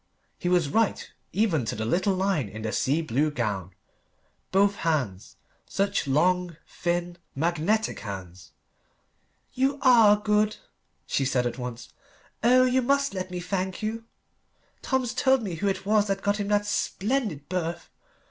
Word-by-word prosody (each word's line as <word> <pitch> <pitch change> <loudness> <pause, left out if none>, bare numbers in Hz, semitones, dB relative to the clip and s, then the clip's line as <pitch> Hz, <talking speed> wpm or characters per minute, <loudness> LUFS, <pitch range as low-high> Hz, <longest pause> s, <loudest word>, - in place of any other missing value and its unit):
He 175 - -1
was 175 -4 +3
right, 220 +8 +1 0.2
even 190 - +1
to - - -3
the 110 - -3
little 190 - +1
line 185 - 0
in 110 +2 -8
the 110 - -2
sea 150 +9 +1
blue 145 +2 +1
gown. 100 - -3 0.8
Both 200 +1 +3
hands; 130 - -2 0.3
such 200 -5 -1
long, 175 +4 +1
thin, 175 0 -2 0.2
magnetic 170 +8 0
hands. 95 -6 -8 1.0
"You 270 +2 +1
are 230 -5 +7
good," 210 0 +1 0.5
she 140 - 0
said 130 -2 +1
at 120 +1 -3
once. 125 -1 -7 0.5
"Oh 250 +2 +6
you 255 +1 +2
must 280 +1 +1
let 185 -1 -4
me 180 -1 -4
thank 185 +2 -3
you. 225 +1 -3 0.8
Tom's 255 -2 -1
told 265 0 +3
me 190 -5 -4
who 180 +5 -2
it 195 0 -2
was 210 0 +3
that 195 0 -2
got 205 +1 +1
him 205 - -2
that 205 0 +2
splendid 205 - -1
berth. 170 -2 -3
185 Hz, 150 wpm, -26 LUFS, 140-210 Hz, 1.0 s, are